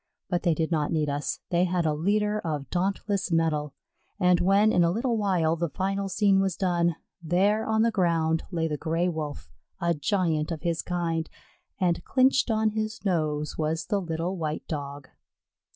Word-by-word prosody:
But 175 -1 +1
they 170 -4 +2
did 160 +1 -1
not 150 -3 0
need 155 -3 0
us; 145 +1 -3
they 175 +1 +3
had 175 -1 0
a 155 - +2
leader 210 +6 +1
of 150 -6 -4
dauntless 195 +1 -1
mettle, 155 -3 0 0.4
and 180 -2 +4
when 200 +4 +4
in 175 - +4
a 170 - +3
little 230 +6 0
while 180 -7 +1
the 170 0 -2
final 195 +3 -2
scene 195 0 +3
was 195 -2 0
done, 170 -3 +1 0.3
there 195 +6 +1
on 220 0 +2
the 230 - +3
ground 165 -5 +1
lay 165 -3 -1
the 150 -2 -2
Gray 165 +3 0
wolf, 155 - -5 0.3
a 170 0 +1
giant 155 0 0
of 165 -1 -5
his 170 -2 0
kind, 165 -2 -2 0.5
and 175 -3 +1
clinched 260 -1 +3
on 220 -1 +2
his 215 0 -4
nose 155 -5 -1
was 160 +1 -1
the 205 -2 0
little 170 +1 -3
white 155 -2 -3
Dog. 145 -2 -5
175 Hz, 180 wpm, -27 LUFS, 160-195 Hz, 0.5 s, and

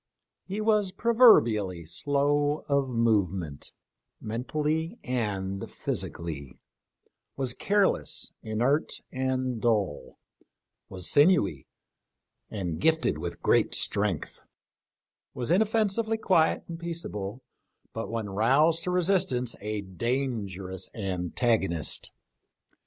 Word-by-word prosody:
He 200 +3 -3
was 210 -3 +2
proverbially 115 - +4
slow 145 - 0
of 140 -2 +1
movement, 95 - 0 0.5
mentally 150 - -2
and 100 -6 -3
physically; 70 -6 -4 0.8
was 130 -3 -1
careless, 200 +5 +1
inert, 120 +8 0
and 130 -2 -1
dull; 105 -10 -1 0.7
was 90 -2 -6
sinewy, 145 - +3 0.8
and 90 -6 -4
gifted 160 - +2
with 85 +1 -6
great - - +3
strength; 100 -6 0 0.9
was 125 +2 -2
inoffensively 220 +2 +2
quiet 175 -7 +2
and 165 -1 -7
peaceable, 130 - -5 0.5
but 115 - -4
when 115 -2 -3
roused 135 +12 +3
to - - -1
resistance 180 - +1
a 105 0 -3
danger 100 -1 -3
ous 95 0 -4
antagonist. 95 -2 0
120 Hz, 90 wpm, -27 LUFS, 95-160 Hz, 0.9 s, proverbially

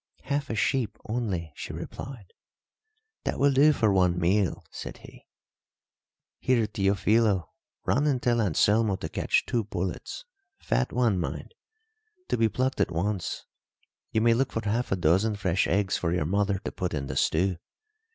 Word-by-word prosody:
"Half 140 +1 -2
a 115 - -2
sheep 115 0 0
only," 100 -9 -2
she - - -6
replied. 125 -9 -8 0.9
"That - - -2
will 140 +1 +4
do 145 +3 +6
for 110 -8 +2
one 90 -2 +3
meal," 90 +2 +1
said - - -7
he. - - -15 1.1
"Here, 125 -3 +2
Teofilo, 100 -1 +2 0.4
run 145 +3 +2
and 135 -4 +2
tell 120 -1 +2
Anselmo 105 +2 +3
to - - -5
catch - - +1
two 115 -2 0
pullets 95 - -4 0.3
fat 125 - 0
ones, 115 -7 +2
mind. 85 - -4 0.8
To - - +2
be 115 -1 +3
plucked 130 +4 0
at - - +2
once. 95 +3 -2 0.7
You 110 - +1
may 115 +1 +5
look 130 +3 +1
for 115 -2 -3
half 115 +4 0
a - - +3
dozen 95 +5 +2
fresh 95 -2 +1
eggs 95 +1 +1
for 85 - -1
your 90 -3 0
mother 100 +3 +1
to - - -2
put 90 -3 -3
in 70 -2 -3
the - - -5
stew. 90 +2 +1
105 Hz, 160 wpm, -27 LUFS, 90-120 Hz, 1.1 s, do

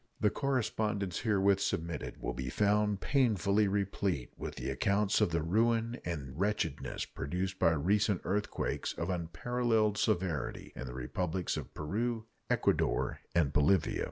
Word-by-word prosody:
The 105 - +3
correspondence 110 -8 -1
herewith 100 -3 +3
submitted 85 -4 -2
will - - -3
be 65 0 -4
found 105 +4 +2
painfully 105 -6 +3
replete 95 -7 -1
with - - -6
accounts 100 0 +1
of - - +4
the 85 -1 0
ruin 115 +6 +1
and 70 -5 -5
wretchedness 80 -10 -1
produced 95 +6 -3
by 85 -3 +4
recent 100 +5 +2
earthquakes, 105 +2 -1
of - - -2
unparalleled 110 +5 0
severity, 95 -7 -1
in 65 - -6
the - - -7
Republics 85 +8 -2
of - - -5
Peru, 110 +8 -2 0.2
Ecuador, - - +1 0.2
and 75 -5 +3
Bolivia. 75 +5 +3
100 Hz, 130 wpm, -32 LUFS, 85-105 Hz, 0.2 s, of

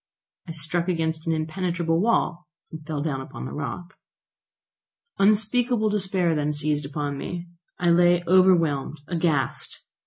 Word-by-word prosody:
I 165 - -5
struck 165 +3 -1
against 160 -2 -1
an - - +2
impenetrable 165 +1 -1
wall, 180 -5 +1 0.2
and 160 -1 -8
fell 150 -3 -2
down 140 -4 -2
upon 130 - -8
the - - -6
rock. 150 +6 -6 1.2
Unspeakable 215 +3 +3
despair 190 -4 +1
then 150 -1 0
seized 150 -1 -1
upon 145 -1 -3
me. 175 +3 -6 0.3
I 175 -1 +2
lay 175 0 +4
overwhelmed, 165 -6 +3
aghast! 160 -6 -1
170 Hz, 130 wpm, -25 LUFS, 150-180 Hz, 1.2 s, lay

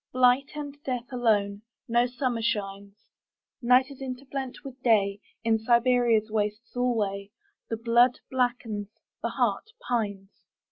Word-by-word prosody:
Blight 255 +2 +4
and 290 -1 -7
death 250 -2 -2
alone.No 230 +1 0
summer 245 -2 -2
shines. 200 -3 -4 0.5
Night 250 +3 +4
is 275 - -12
interblent 265 0 -5
with 270 -2 -10
Day.In 220 0 +1
Siberia's 235 -1 +3
wastes 210 +1 -2
alwayThe 225 -1 -3
blood 240 +2 +5
blackens, 245 -5 -1 0.3
the - - -1
heart - - 0 0.2
pines. 200 -5 -3
235 Hz, 105 wpm, -27 LUFS, 210-250 Hz, 0.5 s, blood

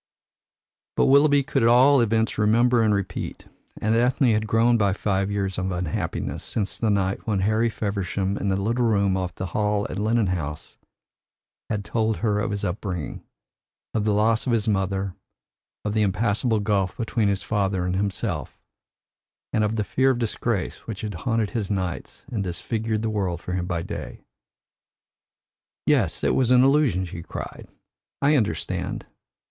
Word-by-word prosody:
But - - +4
Willoughby 140 +1 +5
could 135 - 0
at 115 - +5
all 130 +3 +6
events 110 -1 +1
remember 115 +3 +4
and 110 -1 +3
repeat, 100 -2 -3 0.3
and 110 +1 +1
Ethne 125 +2 +3
had 110 0 +1
grown 115 +2 +3
by 100 -4 +2
five 100 -1 0
years 100 -2 -2
of 95 +1 -2
unhappiness 90 -3 -3
since 100 -3 -3
the 115 - 0
night 100 0 0
when 100 -3 +1
Harry 110 +4 +2
Feversham, 100 -2 -2
in 100 - -1
the 95 - +2
little 115 +6 0
room 100 -4 +2
off 90 -2 -3
the 95 - -4
hall 105 +2 0
at 95 - -4
Lennon 110 +1 +2
House, 80 -4 -4 0.9
had 105 -2 -2
told 110 -1 0
her 105 -2 0
of 105 - -1
his 100 0 -3
upbringing, 90 - -4 0.7
of 110 - 0
the 105 - +2
loss 110 +3 +2
of 120 - +2
his 115 -1 +1
mother, 95 -2 0 0.7
and 105 - -1
the 110 - +2
impassable 105 +3 +1
gulf 100 -3 0
between 115 -2 0
his 100 -1 0
father 95 -4 0
and 90 0 -1
himself, 100 -1 -2 1.0
and 110 - +2
of 105 +1 0
the 105 - 0
fear 130 +6 +2
of 130 - +2
disgrace 115 -3 -2
which 110 -4 -5
had 105 -2 -4
haunted 110 +4 -1
his 110 -5 -2
nights 95 -4 -4
and 110 -5 -1
disfigured 110 +4 -2
the 110 - 0
world 95 -5 -1
for 90 - -6
him 90 -1 -2
by 85 -3 -2
day. - - -7 1.6
"Yes, - - +2
it - - +3
was 130 -3 +2
an 125 0 +6
illusion," 135 - +3
she 85 -1 -7
cried. - - -7 0.5
"I 145 +2 +4
understand. 105 - -1
105 Hz, 170 wpm, -24 LUFS, 95-115 Hz, 1.6 s, all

